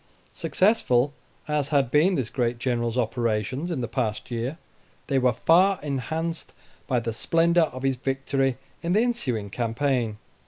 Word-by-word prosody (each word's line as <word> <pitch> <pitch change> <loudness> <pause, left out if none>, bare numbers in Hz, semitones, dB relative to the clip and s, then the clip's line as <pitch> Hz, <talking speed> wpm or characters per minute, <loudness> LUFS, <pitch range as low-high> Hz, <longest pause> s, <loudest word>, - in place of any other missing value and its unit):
Successful 145 - +2 0.3
as 150 -2 0
had 140 -4 +1
been 165 +7 +4
this 130 -7 -2
great 120 -2 0
General's 120 -1 -1
operations 120 - -1
in 160 -7 -2
the 120 - -2
past 115 -1 -3
year, 120 +6 -3 0.5
they 135 -2 +1
were 125 -1 +3
far 180 - +4
enhanced 160 +4 -3 0.3
by 125 -3 +2
the 115 -1 -3
splendor 165 +6 +3
of 130 +1 -8
his 135 -1 +1
victory 135 0 0 0.2
in 170 +1 0
the 210 - +4
ensuing 125 - -2
campaign. 120 -1 -1
135 Hz, 150 wpm, -25 LUFS, 120-160 Hz, 0.5 s, been